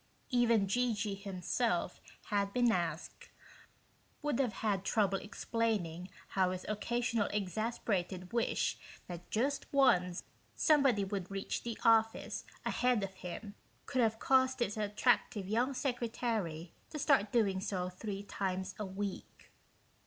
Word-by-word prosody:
Even 235 Hz, -5 st, +4 dB
G.G. 215 Hz, -1 st, 0 dB
himself, 195 Hz, 0 st, -1 dB, 0.3 s
had 200 Hz, -1 st, +2 dB
he -, -, -15 dB
been 245 Hz, -1 st, +4 dB
asked, 170 Hz, -4 st, -3 dB, 0.9 s
would 290 Hz, -4 st, 0 dB
have 250 Hz, -5 st, +1 dB
had 195 Hz, -3 st, +1 dB
trouble 195 Hz, -2 st, +2 dB
explaining 200 Hz, -6 st, -2 dB, 0.2 s
how 190 Hz, -2 st, +2 dB
his 185 Hz, 0 st, -4 dB
occasional 230 Hz, 0 st, 0 dB
exasperated 195 Hz, -2 st, -2 dB
wish 235 Hz, -1 st, +1 dB, 0.3 s
that 175 Hz, 0 st, -8 dB
just 270 Hz, +6 st, -1 dB
once 180 Hz, -11 st, +3 dB, 0.3 s
somebody 275 Hz, -9 st, +4 dB
would 195 Hz, -2 st, -3 dB
reach 195 Hz, 0 st, -3 dB
the 235 Hz, -1 st, -4 dB
office 225 Hz, -1 st, +3 dB, 0.2 s
ahead 245 Hz, -4 st, +2 dB
of 195 Hz, -1 st, -4 dB
him 195 Hz, +3 st, -7 dB, 0.3 s
could 255 Hz, -, 0 dB
have 225 Hz, -1 st, +2 dB
caused 260 Hz, +1 st, +3 dB
his 220 Hz, -4 st, 0 dB
attractive 210 Hz, -1 st, +1 dB
young 240 Hz, +6 st, +1 dB
secretary 225 Hz, -, -2 dB, 0.2 s
to 310 Hz, -, -6 dB
start 270 Hz, -8 st, +3 dB
doing 200 Hz, -5 st, +2 dB
so 190 Hz, -3 st, -2 dB
three 195 Hz, +2 st, -5 dB
times 190 Hz, -1 st, -3 dB
a 210 Hz, -, -2 dB
week 195 Hz, +1 st, -6 dB
210 Hz, 130 wpm, -34 LUFS, 190-235 Hz, 0.9 s, Even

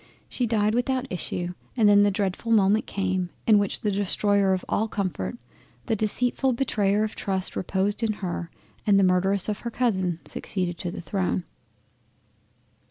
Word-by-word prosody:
She 245 Hz, -, -1 dB
died 215 Hz, -1 st, +2 dB
without 255 Hz, +2 st, 0 dB
issue, 175 Hz, 0 st, -2 dB, 0.3 s
and 220 Hz, -3 st, +5 dB
then 205 Hz, 0 st, +7 dB
the 205 Hz, -, +5 dB
dreadful 200 Hz, +3 st, -2 dB
moment 210 Hz, 0 st, +4 dB
came 185 Hz, -2 st, -1 dB, 0.2 s
in 215 Hz, -2 st, +6 dB
which 200 Hz, -1 st, -2 dB
the 210 Hz, -, 0 dB
destroyer 200 Hz, 0 st, +2 dB
of 185 Hz, -1 st, -1 dB
all 220 Hz, -, 0 dB
comfort, 180 Hz, -, -3 dB, 0.5 s
the 225 Hz, -, +1 dB
deceitful 245 Hz, +5 st, 0 dB
Betrayer 210 Hz, -5 st, +1 dB
of 215 Hz, -, -3 dB
trust 190 Hz, -2 st, -2 dB
reposed 195 Hz, +4 st, -1 dB
in 225 Hz, -2 st, +1 dB
her, 180 Hz, -4 st, -4 dB, 0.4 s
and 200 Hz, -1 st, +5 dB
the -, -, +4 dB
Murderess 185 Hz, +1 st, +2 dB
of 210 Hz, -1 st, -2 dB
her 235 Hz, -, -4 dB
Cousin 190 Hz, -9 st, 0 dB
succeeded 180 Hz, -3 st, -3 dB
to 175 Hz, -, -3 dB
the 170 Hz, -, -6 dB
Throne. 90 Hz, -, -1 dB
200 Hz, 165 wpm, -25 LUFS, 185-215 Hz, 0.5 s, then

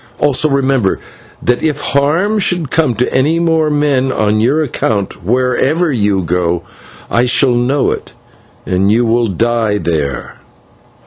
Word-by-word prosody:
Also, 145 Hz, +1 st, +2 dB
remember 135 Hz, -7 st, +1 dB, 0.4 s
that 125 Hz, 0 st, +1 dB
if 150 Hz, -2 st, -1 dB
harm 160 Hz, +10 st, +1 dB
should 175 Hz, -7 st, -1 dB
come 155 Hz, -7 st, +1 dB
to 120 Hz, +4 st, -1 dB
any 150 Hz, +6 st, +2 dB
more 160 Hz, -2 st, +1 dB
men 145 Hz, -3 st, +1 dB
on 110 Hz, -3 st, +1 dB
your 135 Hz, +8 st, +2 dB
account, 105 Hz, -, -2 dB
wherever 130 Hz, -, +1 dB
you 100 Hz, -6 st, 0 dB
go 85 Hz, 0 st, -1 dB, 0.5 s
I 120 Hz, -, +2 dB
shall 125 Hz, +1 st, +2 dB
know 125 Hz, +3 st, +1 dB
of -, -, -2 dB
it, -, -, -20 dB, 0.5 s
and 95 Hz, +2 st, +1 dB
you 120 Hz, +2 st, +2 dB
will 115 Hz, +1 st, +1 dB
die 110 Hz, +2 st, 0 dB
there!" 75 Hz, -8 st, -3 dB
125 Hz, 145 wpm, -14 LUFS, 105-145 Hz, 0.5 s, Also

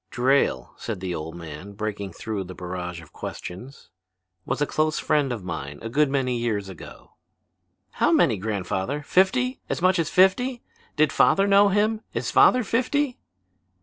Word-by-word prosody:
"Drayle," 125 Hz, -, +1 dB
said 110 Hz, -5 st, -5 dB
the 90 Hz, -1 st, -3 dB
old 80 Hz, 0 st, -6 dB
man, 85 Hz, +4 st, -9 dB
breaking 100 Hz, -2 st, -4 dB
through 105 Hz, 0 st, -4 dB
the 90 Hz, 0 st, -9 dB
barrage 90 Hz, -1 st, -6 dB
of 80 Hz, -, -18 dB
questions, 125 Hz, +10 st, -8 dB, 0.6 s
"was -, -, -1 dB
a 145 Hz, -, +2 dB
close 155 Hz, +1 st, 0 dB
friend 145 Hz, -4 st, +1 dB
of 115 Hz, -6 st, -4 dB
mine 75 Hz, -5 st, -5 dB
a 115 Hz, -, -4 dB
good 145 Hz, +4 st, +2 dB
many 130 Hz, -3 st, 0 dB
years 105 Hz, -4 st, -2 dB
ago." 95 Hz, -, -12 dB, 0.8 s
"How -, -, +1 dB
many, -, -, +3 dB
grandfather? 100 Hz, +6 st, -3 dB
Fifty? 250 Hz, -, +2 dB
As -, -, -1 dB
much 185 Hz, 0 st, +3 dB
as 160 Hz, -, 0 dB
fifty? 240 Hz, +7 st, +3 dB, 0.3 s
Did 155 Hz, -1 st, +2 dB
father 195 Hz, -, +4 dB
know 200 Hz, 0 st, +5 dB
him? 215 Hz, +2 st, +1 dB
Is -, -, -2 dB
father 250 Hz, 0 st, +5 dB
fifty?" 255 Hz, +4 st, 0 dB
125 Hz, 160 wpm, -24 LUFS, -, 0.8 s, know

